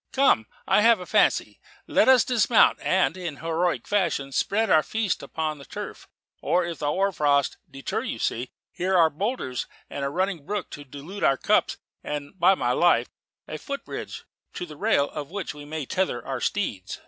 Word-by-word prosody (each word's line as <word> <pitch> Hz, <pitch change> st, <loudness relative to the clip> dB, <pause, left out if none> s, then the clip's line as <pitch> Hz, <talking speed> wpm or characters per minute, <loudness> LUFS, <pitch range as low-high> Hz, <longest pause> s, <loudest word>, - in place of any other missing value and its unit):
Come, 265 Hz, -, +3 dB, 0.2 s
I -, -, +4 dB
have 230 Hz, -1 st, +5 dB
a 180 Hz, -, -7 dB
fancy. -, -, +2 dB, 0.3 s
Let -, -, +3 dB
us 260 Hz, -2 st, +7 dB
dismount, 240 Hz, -2 st, +4 dB
and, 185 Hz, -2 st, +2 dB
in 175 Hz, -5 st, -5 dB
heroic 165 Hz, +3 st, -1 dB
fashion, 185 Hz, -9 st, 0 dB
spread 215 Hz, +10 st, +1 dB
our 155 Hz, -, +6 dB
feast 220 Hz, +2 st, -2 dB
upon 155 Hz, -2 st, -3 dB
the -, -, -11 dB
turf; -, -, -8 dB, 0.3 s
or, 175 Hz, +4 st, +1 dB
if 170 Hz, -2 st, -5 dB
the 150 Hz, -, -2 dB
hoar 195 Hz, +7 st, +1 dB
frost 145 Hz, -4 st, +1 dB
deter 135 Hz, 0 st, -3 dB
you, -, -, -4 dB
see, 125 Hz, +3 st, -2 dB, 0.2 s
here 185 Hz, +1 st, 0 dB
are 165 Hz, -2 st, +5 dB
boulders, 170 Hz, -, -3 dB, 0.2 s
and 140 Hz, -, -4 dB
a 140 Hz, -, 0 dB
running 185 Hz, 0 st, -1 dB
brook 200 Hz, +2 st, -4 dB
to 145 Hz, -, -8 dB
dilute 145 Hz, +9 st, -9 dB
our 135 Hz, -, +4 dB
cups; -, -, +2 dB, 0.3 s
and, 145 Hz, -1 st, -5 dB
by 185 Hz, +3 st, +5 dB
my -, -, 0 dB
life, -, -, +3 dB, 0.4 s
a -, -, -6 dB
foot 280 Hz, -1 st, -6 dB
bridge, -, -, -7 dB, 0.3 s
to -, -, -4 dB
the 155 Hz, -3 st, -11 dB
rail 145 Hz, 0 st, +1 dB
of 145 Hz, -1 st, -6 dB
which 195 Hz, 0 st, -5 dB
we 145 Hz, 0 st, -10 dB
may 155 Hz, -1 st, -4 dB
tether 185 Hz, -6 st, -1 dB
our 130 Hz, -2 st, -4 dB
steeds." 110 Hz, -, -2 dB
165 Hz, 190 wpm, -25 LUFS, 145-195 Hz, 0.4 s, us